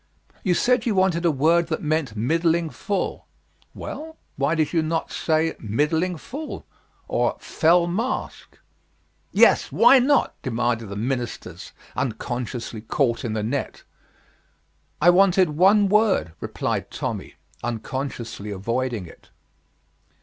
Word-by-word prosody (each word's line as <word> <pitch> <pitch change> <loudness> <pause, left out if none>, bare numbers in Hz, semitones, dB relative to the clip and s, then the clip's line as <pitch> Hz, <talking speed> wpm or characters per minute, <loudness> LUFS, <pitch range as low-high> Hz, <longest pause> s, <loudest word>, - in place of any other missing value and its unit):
"You 180 -3 +2
said 250 +2 +2
you 215 - +1
wanted 180 -2 +2
a - - +5
word 160 +4 +3
that - - -3
meant 150 -7 -1
middling 165 +7 +1
full. 200 -1 -3 0.5
Well, 320 +1 -7 0.2
why 140 +4 +1
did 155 0 0
you 165 - +3
not 160 +1 -2
say 160 0 0
middling 150 - 0
full 290 - -7 0.4
or - - 0
fell 170 +2 +3
mask?" 230 +10 -3 0.7
"Yes, - - +4
why 270 - +7
not?" 275 +3 +2
demanded 120 -3 -1
the 100 - -6
ministers, 120 +2 -4 0.2
unconsciously 120 -2 -4
caught 115 +1 0
in 115 - -2
the 110 -1 -2
net. 130 +5 -3 1.2
"I 175 +3 +6
wanted 185 -2 +4
one 195 +6 +4
word," 210 - +2
replied - - -3
Tommy, - - -5 0.3
unconsciously 115 -2 -4
avoiding 115 +2 -2
it. 80 - -16
155 Hz, 120 wpm, -23 LUFS, 120-180 Hz, 1.2 s, why